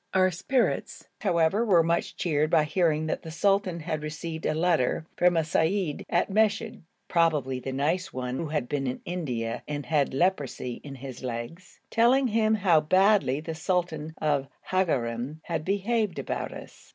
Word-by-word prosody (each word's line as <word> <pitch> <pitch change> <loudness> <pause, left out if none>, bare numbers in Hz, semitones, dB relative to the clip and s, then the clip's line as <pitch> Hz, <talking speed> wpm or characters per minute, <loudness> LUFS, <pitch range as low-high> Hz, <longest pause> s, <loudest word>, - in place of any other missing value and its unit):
Our 185 0 +4
spirits, 215 +9 -1
however, 180 +1 +2
were 180 -7 +4
much 170 +1 0
cheered 155 -3 +1
by 160 -2 +4
hearing 155 -1 +1
that 155 - -2
the 160 - -8
sultan 185 +1 +1
had 155 -1 -3
received 160 +2 -4
a 155 - 0
letter 160 -4 +1
from 175 -1 +3
a - - +4
seyyid 160 +1 0
at 175 - +2
Meshed 215 +1 +1 0.3
(probably 150 -7 +1
the 135 - -5
nice 160 +8 -1
one 125 0 -3
who 165 - -3
had 150 -5 -2
been 135 -1 -2
in 125 - -3
India 125 -10 -3
and 145 -2 -4
had 145 0 +1
leprosy 140 -7 -1
in 140 -2 -8
his 130 -1 -9
legs), 125 +8 -6
telling 250 +3 +4
him 220 0 +2
how 185 -6 +4
very 150 - -16
badly 190 -7 +4
the 160 +1 -5
sultan 160 -2 -2
of 145 -3 0 0.2
Hagarein 135 -6 0
had 165 -2 -3
behaved 205 +2 0
about - - -3
us. - - -12
160 Hz, 170 wpm, -27 LUFS, 145-185 Hz, 0.3 s, Our